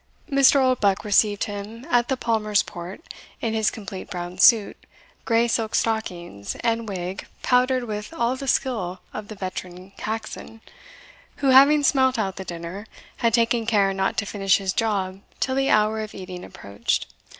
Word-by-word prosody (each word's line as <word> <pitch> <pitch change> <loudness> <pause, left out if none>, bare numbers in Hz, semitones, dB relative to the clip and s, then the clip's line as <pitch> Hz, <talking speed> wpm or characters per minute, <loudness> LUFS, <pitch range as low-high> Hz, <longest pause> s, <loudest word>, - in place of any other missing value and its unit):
Mr. 275 0 +6
Oldbuck 235 -7 +2
received 205 0 +3
him 210 +4 -6
at 240 -1 +3
the 265 - 0
Palmer's 215 -4 +1
port 180 - -9 0.4
in 225 -1 -2
his 220 -1 +2
complete 195 -3 -8
brown 175 0 -6
suit, 220 -4 +6 0.5
grey 230 0 +3
silk 225 -1 -1
stockings, 175 - -2
and 230 -1 0
wig 185 0 -5 0.2
powdered 255 0 +3
with 210 -2 -5
all 250 -6 0
the 275 +1 -7
skill 200 -10 0
of 215 -1 -6
the 215 - -8
veteran 185 -1 -7
Caxon, 225 0 -5 0.8
who 275 - 0
having 280 +3 +7
smelt 260 -2 +3
out 195 -4 -2
the 190 - -5
dinner, 175 +4 -7 0.3
had 230 -1 +2
taken 230 -1 +1
care 200 -4 +3
not 190 0 -1
to 205 - 0
finish 195 -2 +2
his 190 -2 -2
job 195 -4 -1 0.2
till 260 - 0
the 270 +1 +1
hour 215 +1 +3
of 215 -1 -6
eating 185 -1 -8
approached. 100 +3 -3
215 Hz, 160 wpm, -24 LUFS, 190-235 Hz, 0.8 s, having